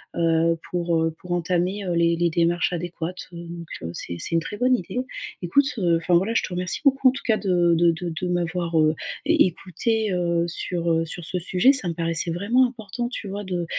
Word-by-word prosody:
heu, 165 0 +2
pour, 170 -2 0
heu, 165 - +1
pour 180 - -9
entamer, 175 +3 0
heu, 180 - -1
les 170 0 +3
les 170 0 +1
démarches 170 +1 +1
adéquates. 175 +1 -5
Heu, 170 - -8
donc, 170 -1 -8
heu, 80 - -5
c'est 85 0 -5
c'est - - -3
une - - +4
très 205 - -6
bonne 255 +2 +3
idée. 240 +3 -4 0.4
Écoute, 230 +11 +3
heu, 175 -5 +2
enfin 165 +2 -1
voilà, 195 +6 +2
je - - +2
te - - -4
remercie 180 0 -1
beaucoup, 270 -2 +5
en - - +1
tout 275 +2 -8
cas, 220 -2 +3
de 175 -3 +2
de 170 +1 +4
de 170 0 -4
de 180 - -1
m'avoir, 175 -1 0
heu, 155 0 +4 0.3
é 320 - +3
écoutée, 205 +4 -1
heu, 170 -1 +1
sur, 170 0 -2
heu, 165 0 +1
sur 165 +1 -5
ce 180 - -1
sujet, 185 +8 +4
ça 225 -10 +2
me 170 - -1
paraissait 165 0 0
vraiment 225 +9 +3
important, 240 0 -5
tu 235 -4 -6
vois 200 +1 -5
de, 180 -3 -3
175 Hz, 225 wpm, -24 LUFS, 170-200 Hz, 0.4 s, beaucoup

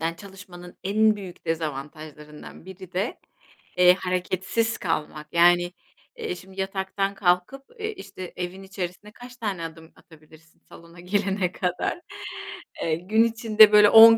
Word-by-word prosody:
evden 165 +1 -1
çalışmanın 190 -2 -12
en 215 +2 +3
büyük 190 -4 -10
dezavantajlarından 150 0 -6
biri 185 -1 -11
de, 190 +6 -2 0.6
eee, 180 0 +7
hareketsiz 185 +5 -1
kalmak. 155 -3 -3
Yani, 175 +1 +4 0.4
eee, - - -3
şimdi 190 +2 -7
yataktan 195 +1 -2
kalkıp 180 +8 +1 0.2
eee, 435 0 -3
işte, 185 - -9
evin 180 +2 -5
içerisine 190 +1 -6
kaç 245 +3 -13
tane 200 -7 -3
adım 160 0 -11
atabilirsin 160 0 -20
salona 170 +1 -14
girene 195 0 0
kadar. 180 - -2 0.8
Eee, 160 - +1
gün 205 +7 +2
içinde, 220 -2 +5
böyle, 210 -1 +8
10 225 +1 +10
185 Hz, 130 wpm, -25 LUFS, 170-205 Hz, 0.8 s, 10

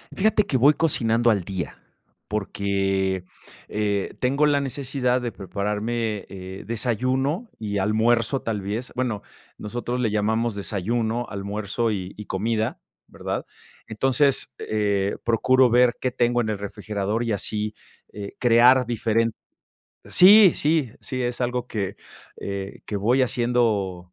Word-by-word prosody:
fíjate 210 +1 +3
que 130 - 0
voy 140 +5 +6
cocinando 120 -7 +2
al 100 -5 +2
día, 90 -6 -5 0.5
porque, 95 -2 -1 0.4
eh, 105 -2 -1
tengo 140 +4 +2
la 145 -1 +3
necesidad 130 -2 -1
de 120 -1 -3
prepararme, 105 +3 -3
eh, 95 0 -8
desayuno 130 - -1
y 105 -2 -3
almuerzo, 115 +5 +2
tal 110 -3 -2
vez 105 +6 -4
bueno, 120 -5 -1 0.4
nosotros 120 +3 -4
le 120 -3 +1
llamamos 110 +2 0
desayuno, 110 +4 -2
almuerzo, 105 +3 -2
y 95 -3 -4
y 105 - -7
comida, 110 +3 -1 0.3
¿verdad? - - -4 0.4
Entonces, 135 +5 +1
eh, 100 -2 0
procuro 130 +3 +4
ver 125 +1 +4
qué 130 - 0
tengo 120 -1 +1
en 110 - -2
el 105 - -1
refrigerador 105 +2 -3
y 115 - -1
así, 105 +1 -3 0.4
eh, 100 -1 -7
crear 125 +2 +6
diferen 115 -1 +1 0.7
sí, 195 0 +8
sí, 150 -6 +1
sí, 130 -2 -4
es 120 0 -2
algo 125 0 -1
que, 100 -6 -3 0.4
eh, 100 0 -5
que 105 - -3
voy 120 +7 +2
haciendo 110 -7 0
115 Hz, 130 wpm, -24 LUFS, 100-125 Hz, 0.7 s, sí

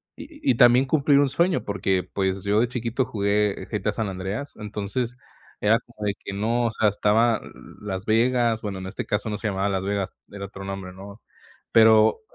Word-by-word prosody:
y 295 -3 -2
y - - +1
también 125 +2 +6
cumplir 140 0 +3
un 140 -1 +3
sueño, 170 +6 +1
porque 95 -2 0
pues 95 0 -2
yo 100 +1 +2
de 120 - +2
chiquito 120 +1 -2
jugué 105 -1 0
GTA - - -1
San 110 - -2
Andreas, 95 +9 -5
entonces 105 +4 -4 0.4
era 110 +2 +4
como 115 -3 -9
de 100 - +1
que - - -8
no 115 +4 0
o 115 - -2
sea 110 - +1
estaba, 110 +3 +2
l - - -12 0.3
Las 95 -2 -5
Vegas. 115 0 +2
Bueno, 100 -3 -4
en 95 - -6
este 95 - -5
caso 105 +1 -2
no 105 - -3
se 110 - -3
llamaba 100 0 -1
Las 95 -1 -1
Vegas, 100 -1 -2 0.2
era 100 -1 -6
otro 95 0 -10
nombre, 95 -1 -6
¿no? 100 +3 -11 0.5
Pero, 110 -1 +5
105 Hz, 200 wpm, -24 LUFS, 100-120 Hz, 0.5 s, también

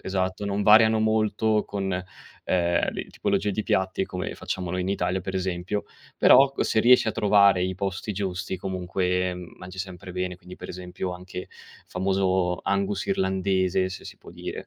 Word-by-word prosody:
esatto, 95 +1 -2
non 100 0 -1
variano 110 +1 +6
molto 110 0 +2
con, 95 -2 -3
ehm, 90 -1 -2
le - - -5
tipologie 105 - 0
di 105 +1 -2
piatti 95 0 0
come 90 -1 -5
facciamo 90 -2 -4
noi 90 0 -1
in 95 - -3
Italia 90 -1 0
per 95 +1 -6
esempio, 95 +2 -2 0.3
però 135 0 +6
ecco - - -1
se 110 - +1
riesci 120 0 +6
a - - 0
trovare 100 -4 +4
i 95 0 -2
posti 100 +2 -3
giusti 95 -1 -3
comunque, 90 0 -1
mhmm, 90 -1 -10
mangi 90 +1 -10
sempre 90 0 -8
bene, 90 0 -3
quindi 90 0 -12
per 90 - -10
esempio 90 0 -5
anche 90 0 -8 0.4
famoso 95 -1 0
Angus 100 0 -1
irlandese, 95 -1 +1
se 95 - -8
si - - -9
può - - -14
dire, - - -7
95 Hz, 170 wpm, -25 LUFS, 90-100 Hz, 0.4 s, variano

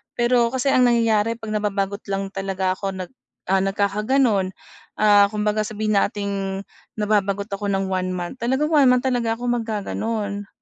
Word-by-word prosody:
Pero 240 0 +3
kasi 260 +2 0
ang 250 -2 +5
nangyayari 230 -1 +2
'pag 225 -2 -7
nababagot 200 -1 -1
lang 195 0 -3
talaga 195 -1 -2
ako 195 +1 -3
nag 185 +2 -6 0.4
ah, 195 - +4
nagkakagano'n, 205 +1 +1 0.5
ah, 205 -1 +6
kumbaga 210 0 -1
sabihin 215 0 -2
nating 200 -2 -2 0.3
nababagot 205 -1 0
ako 200 +1 -3
ng 195 -1 -1
one 185 0 -1
month, 180 +8 -5
talagang 265 +6 0
one-month 250 -4 +5
talaga 240 -3 +1
ako 245 - -6
maggagano'n. 215 -2 -3
210 Hz, 145 wpm, -22 LUFS, 195-230 Hz, 0.5 s, ah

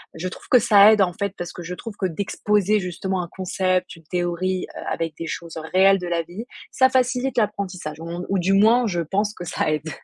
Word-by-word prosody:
Je 165 +3 -4
trouve 185 - -10
que 250 - +7
ça 210 -1 +7
aide 215 - +4
en 180 -2 +2
fait, 200 -2 -3
parce 175 0 -6
que 175 - -8
je 180 +2 -5
trouve 225 +2 -8
que 190 - 0
d'exposer 205 +3 0
justement 185 +1 -3
un 170 - -8
concept, 185 0 -1
une 165 - -17
théorie, 180 +2 -2
heu, - - -6
avec 165 -1 -2
des 165 - -5
choses 170 +1 -6 0.2
réelles 195 +1 +5
de 180 - -5
la 170 -1 0
vie, 185 +8 -8 0.3
ça 260 0 +4
facilite 255 0 0
l'apprentissage. 195 -7 -2
Ou 170 +2 -5
ou 195 0 0
du 180 +2 +1
moins, 225 +4 +5
je 175 -4 -1
pense 200 +6 -1
que 175 - -8
ça 160 - -1
aide. 155 +1 -2
185 Hz, 225 wpm, -22 LUFS, 175-205 Hz, 0.3 s, que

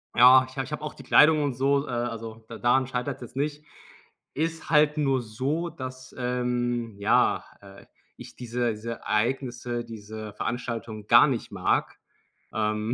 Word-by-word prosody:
Ja, 130 +2 +8
ich 130 - -15
habe 135 - -1
ich 150 - -12
habe 150 - -4
auch 150 - -5
die - - -13
Kleidung 155 0 +5
und 140 -4 -1
so, 140 +2 +2
äh, - - -8
also 115 -2 -4
da 115 -1 -8
daran 125 +1 +2
scheitert's 130 +1 -3
jetzt 120 +1 -10
nicht. 150 +1 -3 0.7
Ist 165 +2 -3
halt 150 -1 +4
nur 135 -4 +1
so, 135 +10 -2
dass, 130 -4 -9
ähm, 120 -2 -1
ja, 100 +2 +2 0.2
äh, 100 0 -14 0.3
ich - - -12
diese 120 -1 -1
diese 110 +2 -6
Ereignisse, 120 +1 -2
diese 110 -1 -8
Veranstaltung 115 -2 -4
gar 120 +6 +7
nicht 125 -4 -3
mag, - - 0 0.6
ähm, 110 +1 -1
125 Hz, 160 wpm, -26 LUFS, 115-135 Hz, 0.7 s, Ja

